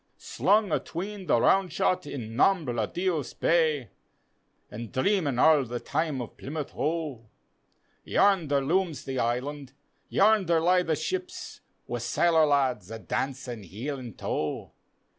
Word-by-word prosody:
Slung 210 -2 +1
atween 190 +5 -4
the 120 - +4
round 190 +6 +3
shot 175 -1 0
in 115 -6 -6
Nombre 125 - +2
Dios 175 -6 -2
Bay, 155 - +1 0.8
An' 115 +3 -6
dreamin' 150 - +1
arl 150 +1 +5
the 120 0 -4
time 150 -4 -2
o' - - -7
Plymouth 150 +5 -6
Hoe. 150 -8 -3 0.7
Yamder 165 -9 +2
lumes 165 -3 0
the 130 -1 -3
Island, 135 +4 -2 0.4
yamdcr 195 -5 +4
lie 180 +2 +4
the 160 -3 0
ships, 365 - -5 0.2
Wi' - - -4
sailor 165 -2 +3
lads 130 -9 +1
a 115 - -6
dancin' 130 0 -4
heel 115 - -5
an' 120 -5 -9
toe. 75 - -3
150 Hz, 130 wpm, -27 LUFS, 125-175 Hz, 0.8 s, arl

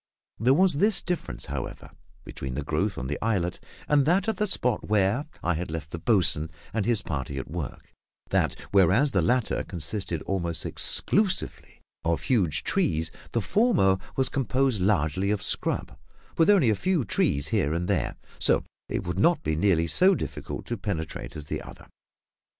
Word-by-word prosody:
There 125 +5 +4
was 185 +3 +5
this 205 +4 +5
difference, 180 -1 -4
however, 70 -2 -6 0.3
between 65 -1 -6
the 75 - -2
growth 90 +8 -1
on - - -4
the 75 +7 -4
islet 95 -6 0 0.3
and 145 -1 +4
that 180 +6 +2
at 220 - 0
the 210 - +1
spot 125 - 0
where 105 +7 +2 0.2
I 90 - +2
had 85 +1 -4
left 80 -2 -5
the 85 - -5
boatswain 85 -6 +2 0.2
and 110 -1 -1
his 115 -5 +2
party 70 -2 -4
at 65 +1 -6
work, 80 -6 -6 0.4
that - - +1 0.2
whereas 100 - +4
the - - +2
latter 125 -1 +1
consisted 85 -1 -2
almost 85 -4 -2
exclusively 200 -2 0 0.2
of 85 0 0
huge 95 - +1
trees, 80 +1 0 0.2
the 115 - +1
former 100 - +3 0.2
was 130 - +2
composed 130 -4 0
largely 95 -1 +1
of 105 -1 0
scrub, - - -1 0.4
with 165 +2 +3
only 175 - +5
a - - +2
few 170 - 0
trees 70 -6 +1
here 75 - +1
and 85 +2 -1
there, - - 0 0.2
so - - +3 0.3
that - - -3
it - - -1
would 90 +2 -3
not 170 - +3
be 80 0 0
nearly 85 -1 +2
so 185 - +4
difficult - - -5
to 120 - -3
penetrate 80 - -4
as 75 - -6
the - - -4
other. - - -12
95 Hz, 175 wpm, -26 LUFS, 80-130 Hz, 0.4 s, was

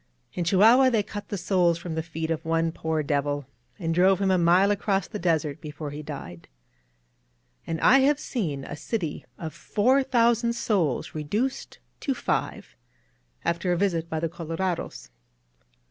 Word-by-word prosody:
In 180 - -2
Chihuahua, 225 +9 +6
they 225 -4 +1
cut 205 0 -8
the 200 - -3
soles 175 -2 +2
f 170 - -13
roiA 170 - -4
the 160 - -1
feet 160 0 -4
of 160 -1 -2
one 165 0 +1
poor 160 -1 -2
devil, 145 0 -1 0.3
and 165 -1 -2
drove 185 +2 +4
him 195 -1 +2
a 185 - +4
mile 180 +4 +4
across 200 -2 0
the - - -6
desert 160 -3 0
before 150 -1 -6
he 150 +1 -6
died. 140 - -8 1.2
And 165 -1 -2
I 270 - +6
have 280 +2 +3
seen 160 - -3
a 145 - -6
city 165 0 -4
of 160 -2 -6
four 255 +6 +2
thousand 235 -2 +2
souls 185 - 0
reduced 205 - -2 0.2
to 275 - -1
five - - -3 0.7
after 170 +2 0
a 175 - +1
visit 170 -4 0
by 160 - -2
the 165 - 0
colorados. 165 - -4
170 Hz, 165 wpm, -26 LUFS, 160-205 Hz, 1.2 s, Chihuahua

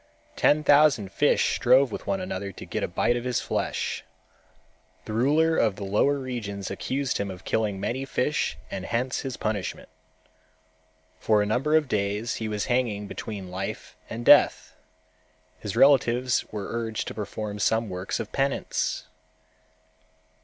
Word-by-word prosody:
Ten 150 +1 +3
thousand 145 -9 +4
fish - - +2
strove 130 +1 +4
with - - -7
one 195 - 0
another 100 - -4
to - - -10
get - - -3
a - - 0
bite 120 - +1
of 120 - -3
his 125 -1 0
flesh. - - -2 1.0
The 110 - -5
ruler 150 +8 +3
of 110 -4 +2
the 100 - -7
lower 105 +9 +2
regions 110 -8 -5
accused 130 +7 -2
him 100 0 -2
of 95 -1 -9
killing 105 -3 0
many 125 +7 -2
fish 140 +3 -1
and - - -4
hence 125 +3 -1
his 130 -1 -5
punishment. 105 -3 -3 1.3
For 105 -2 +3
a - - -1
number 130 +9 +1
of 155 -2 +3
days 105 +1 -1
he 110 - -3
was 105 -1 -2
hanging 120 -5 0
between 100 -3 -7
life 95 +2 -5
and - - -6
death. - - +5 0.8
His 105 - -5
relatives 125 -3 +4
were 105 -2 -5
urged 115 -2 -3
to - - -7
perform 105 0 -5
some 110 +2 +1
works 90 0 -4
of - - -5
penance. 135 0 -1
115 Hz, 155 wpm, -26 LUFS, 100-130 Hz, 1.3 s, death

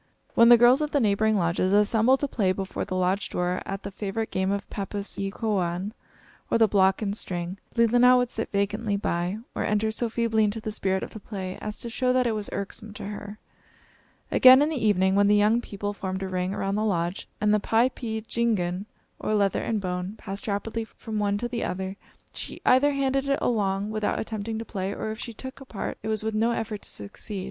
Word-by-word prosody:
When 230 0 +6
the 240 - +10
girls 245 +4 +6
of 300 - 0
the 290 - +1
neighboring 215 -1 +2
lodges 175 +1 +1
assembled 220 +5 +4
to 285 - +1
play 200 -8 +1
before 190 0 -4
the 185 - -4
lodge 185 +2 0
door 180 +1 -1
at 195 0 -4
the 200 - -5
favorite 210 +3 -3
game 190 0 0
of 200 0 -2
pappus 200 0 -4
e 195 0 -1
kowaun, 195 -3 -1 0.6
or - - +3
the 225 -1 +5
block 190 0 +3
and 200 -1 -1
string, 180 -1 -4 0.2
Leelinan 245 +2 +5
would 245 -1 +1
sit 225 - -3
vacantly 205 +1 0
by, 175 0 -1 0.2
or - - -2
enter 210 +1 +1
so 230 +1 -1
feebly 225 -1 +1
into 210 +1 0
the 215 0 -4
spirit 190 -2 -1
of - - -6
the 220 - -8
play 190 -3 -6
as 210 0 -4
to - - -6
show 250 +2 0
that 255 0 +3
it 235 - +2
was 215 -2 -3
irksome 200 +2 -5
to 205 - -7
her. 205 0 -7 0.9
Again, 260 +2 +8
in 300 - +1
the 290 -7 -2
evening, 190 -3 +3
when 200 +1 +4
the 205 - +5
young 210 +3 +4
people 205 -2 -4
formed 190 -1 -4
a - - -2
ring 185 0 -1
around 195 0 -2
the 210 +1 0
lodge, 175 -3 -1
and 210 0 +3
the 210 - +4
piepeendjigun, 225 -5 0 0.3
or 215 - 0
leather 200 -2 +2
and 220 -2 0
bone, 180 +1 -3
passed 195 +1 -7
rapidly 220 +2 -2
from 220 -1 -6
one 205 -1 +1
to 240 +3 -2
the 240 -1 -3
other, 190 +1 -3 0.4
she - - -6
either 280 +3 +5
handed 275 0 0
it 275 - +3
along 205 -3 0
without 215 -1 -1
attempting 220 0 -4
to 225 - -5
play, 195 -3 -3
or 215 - -3
if 220 - -7
she 235 - -5
took 260 +4 -9
a - - -9
part, 215 -6 -5
it 220 - -6
was 215 -1 -1
with 220 0 -1
no 220 +2 +2
effort 220 -2 -3
to - - -9
succeed. 145 - -5
210 Hz, 220 wpm, -26 LUFS, 195-230 Hz, 0.9 s, the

